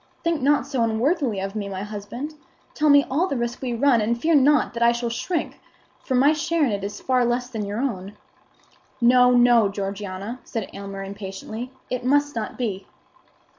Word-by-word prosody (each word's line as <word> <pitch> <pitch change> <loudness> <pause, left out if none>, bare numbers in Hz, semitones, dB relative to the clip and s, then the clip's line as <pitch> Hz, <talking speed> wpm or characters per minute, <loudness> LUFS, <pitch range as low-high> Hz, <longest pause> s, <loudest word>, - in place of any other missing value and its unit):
Think 335 -3 0
not 280 -2 +3
so 275 -3 -2
unworthily 235 - 0
of 195 +2 -5
me, 205 -2 -3
my 190 0 -4
husband. 215 +8 -6 0.4
Tell 305 0 +2
me 285 -1 +6
all 325 +8 +2
the 280 - -2
risk 235 0 -3
we 250 -3 -2
run, 245 -1 +3
and 235 +3 0
fear 325 +6 +2
not 295 -1 +4
that 235 - -5
I 235 0 +6
shall 235 0 -3
shrink; 330 +7 -3 0.4
for 260 - -3
my 280 +4 +5
share 325 0 +1
in 245 - 0
it 200 -1 -3
is 205 +1 -5
far 255 -1 +1
less 240 +1 0
than 220 -5 -4
your 205 +2 -3
own." 205 -7 -3 0.8
"No, 250 +1 +5
no, 240 -3 +5
Georgiana!" 200 +3 -5
said 225 -5 -5
Aylmer, 195 0 -7
impatiently; 200 +5 -7 0.2
"it 250 0 -2
must 290 +3 +2
not 220 -2 -4
be." 205 -6 -3
240 Hz, 190 wpm, -23 LUFS, 205-275 Hz, 0.8 s, me